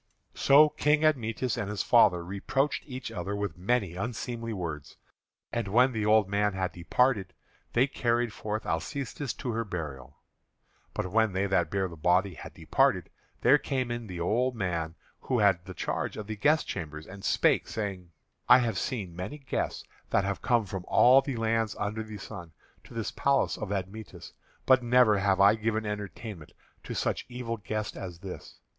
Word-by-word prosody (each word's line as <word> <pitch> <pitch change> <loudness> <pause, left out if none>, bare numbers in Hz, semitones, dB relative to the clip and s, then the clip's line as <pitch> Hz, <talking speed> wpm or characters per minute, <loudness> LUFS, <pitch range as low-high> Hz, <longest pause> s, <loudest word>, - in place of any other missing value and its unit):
So 145 +3 +6
King 150 +1 +2
Admetus 125 -4 0
and 105 - -3
his 105 -1 -2
father 85 -1 +4
reproached 135 +10 -1
each 130 -3 -6
other 100 -1 -4
with 100 -5 -3
many 100 0 0
unseemly 115 +2 -4
words. 80 -8 -5 0.6
And 115 -3 -1
when 125 +6 +4
the 110 -3 -1
old 105 -2 +5
man 105 +1 +1
had 95 -1 -2
departed, 100 +2 +1 0.4
they 125 +3 +4
carried 120 -4 0
forth 110 +1 -4
Alcestis 130 - -3
to 125 - -4
her 115 0 -1
burial. 75 - -6 0.8
But 90 - -3
when 110 -1 +3
they 95 +1 +1
that 95 -1 +1
bare 95 -1 0
the 85 - -10
body 90 +4 +2
had 75 - -10
departed, - - +1 0.3
there 135 +4 +6
came 130 -4 -2
in 120 -1 -4
the 90 -3 -6
old 120 +9 +1
man 85 -6 -2 0.3
that 130 - +2
had 95 -4 +3
the 95 -1 -9
charge - - -3
of 105 - -5
the 110 +1 -5
guest 150 +10 +2
chambers, 75 -4 -5
and 95 +1 -11
spake, - - +2
saying: 95 -5 -4 0.4
"I - - +10
have 115 -6 0
seen 100 -10 -3
many 90 - -5
guests 135 -3 -3 0.3
that 100 - +2
have 100 0 -2
come 120 -3 +2
from 95 -1 -5
all 130 +2 +6
the 135 -1 -4
lands 115 -1 0
under 105 +2 -2
the 110 -1 -7
sun 85 -4 -9 0.3
to - - -13
this 115 -2 -2
palace 140 -1 +1
of 100 - -5
Admetus, 100 +2 -6 0.3
but 130 -1 +5
never 120 -4 +4
have 95 -1 +2
I 100 +1 +7
given 110 0 -1
entertainment 105 -4 -6 0.3
to - - -5
such - - -1
evil 120 -2 -4
guest 105 +1 -4
as 90 -3 -7
this. 95 +1 -9
105 Hz, 175 wpm, -29 LUFS, 95-120 Hz, 0.8 s, I